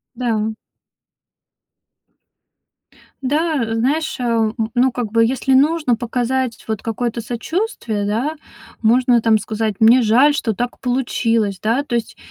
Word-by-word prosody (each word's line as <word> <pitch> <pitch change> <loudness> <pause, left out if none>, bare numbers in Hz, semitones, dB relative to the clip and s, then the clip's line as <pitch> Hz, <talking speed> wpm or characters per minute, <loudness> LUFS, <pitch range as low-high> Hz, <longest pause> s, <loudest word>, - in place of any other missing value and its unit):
Да. 225 -3 -1 2.7
Да, 285 -4 0
знаешь, 300 +7 0
ам, 230 -2 0
н 225 -1 -2
ну, 250 +1 +3
как 235 -4 -3
бы, 230 0 +3
если 260 +2 0
нужно 290 -3 +3
показать 245 0 -2
вот 220 -2 -3
какое-то 235 +1 -3
сочувствие, 235 - -3
да, 255 +10 -1 0.4
можно 240 +1 +3
там 220 -1 +3
сказать: 215 0 -2
"Мне 235 +3 +6
жаль, 255 +7 +4
что 230 -6 -1
так 245 +4 -4
получилось". 230 -5 0
Да, 230 +6 +1
то 240 -4 -2
есть 230 - -4
235 Hz, 125 wpm, -19 LUFS, 225-260 Hz, 2.7 s, Мне